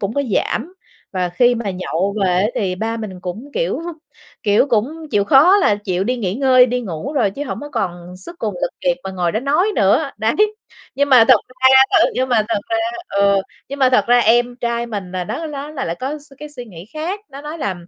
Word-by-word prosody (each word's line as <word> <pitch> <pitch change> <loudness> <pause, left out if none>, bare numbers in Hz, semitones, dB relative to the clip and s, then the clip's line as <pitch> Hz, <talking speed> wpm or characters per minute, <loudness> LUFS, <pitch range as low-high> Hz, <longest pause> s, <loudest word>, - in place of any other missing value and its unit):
cũng 200 +2 -3
có 285 - +1
giảm. 320 - -2 0.4
Và 180 -1 -1
khi 245 +7 +3
mà 230 -4 -3
nhậu 185 +1 -2
về - - +3
á 205 - +2
thì 185 -3 -1
ba 225 +4 -3
mình 200 -5 -7
cũng, 210 +11 -7
kiểu - - -1 0.6
kiểu, 210 +6 +3
cũng 290 +8 -1
chịu 200 -1 +2
khó 310 - +6
là 215 - +3
chịu 190 -2 -2
đi 250 +3 -1
nghỉ 195 -5 -2
ngơi, 255 -1 +5
đi 250 +1 -1
ngủ 200 - -5
rồi, 235 -9 +1
chứ 280 +8 -6
hổng 275 - -5
có 290 - -7
còn 175 -5 -4
sức 340 - -11
cùng 210 -4 -3
lực - - 0
kiệt 265 -1 +1
mà 190 - -4
ngồi 180 -2 -1
đó 220 - -1
nói 300 +9 +1
nữa, 255 +9 +2
đấy. 220 +1 0 0.6
Nhưng 285 +2 +1
mà 250 -4 +7
thật 255 - +8
ra 255 +1 0 0.2
ờ, - - +4
nhưng 260 +1 0
mà 230 -3 +3
thật 230 - 0
ra 225 - +1 0.3
ờ, 200 -1 +2 0.3
nhưng 280 +1 -6
mà 260 - +4
thật 255 - +3
ra 245 0 +5
em 240 +2 +3
trai 235 0 -2
mình 200 -5 -6
là 180 -1 -3
nó 320 - -4
nó 290 -1 -6
lại 275 - -4
lại 165 - -2
có 280 +4 -3
s 290 0 -18
cái 300 - -8
suy 255 -4 -9
nghĩ 180 -4 -12
khác. 345 +7 -3
Nó 275 +1 -9
nói 300 +3 -7
là 200 -10 -2
235 Hz, 240 wpm, -18 LUFS, 195-275 Hz, 0.6 s, thật